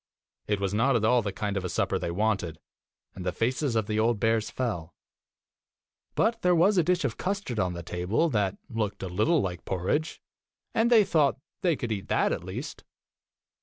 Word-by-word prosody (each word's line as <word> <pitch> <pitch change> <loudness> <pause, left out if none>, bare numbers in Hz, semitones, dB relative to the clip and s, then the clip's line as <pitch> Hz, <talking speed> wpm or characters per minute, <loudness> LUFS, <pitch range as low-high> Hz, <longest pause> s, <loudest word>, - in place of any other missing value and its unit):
It 105 -1 0
was 100 -1 -1
not 125 +5 +3
at 110 -2 +2
all 125 +2 +4
the 100 -2 -3
kind 100 +1 -3
of 95 - -1
a 90 - -3
supper - - 0
they - - -3
wanted, 95 -3 0 0.6
and 95 - -7
the 90 - 0
faces 125 - 0
of 110 -2 +1
the 105 +1 -1
old 115 -1 +2
bears 110 0 +1
fell; 90 -10 -3 1.2
but 230 0 +1
there 180 0 +4
was 185 +4 +4
a - - +4
dish 180 -1 +1
of 120 - -2
custard 195 - -2
on 90 -2 0
the 85 0 -6
table 90 - 0
that 105 -7 0
looked 105 -3 -3
a - - -2
little 120 - +2
like 90 -3 -4
porridge, 95 - -1 0.5
and 225 +1 +3
they 230 -3 +7
thought 155 -8 +2 0.2
they 175 -4 +2
could 120 -4 -4
eat 100 -3 -3
that - - +2
at - - -2
least. - - -6
110 Hz, 200 wpm, -28 LUFS, 95-150 Hz, 1.2 s, they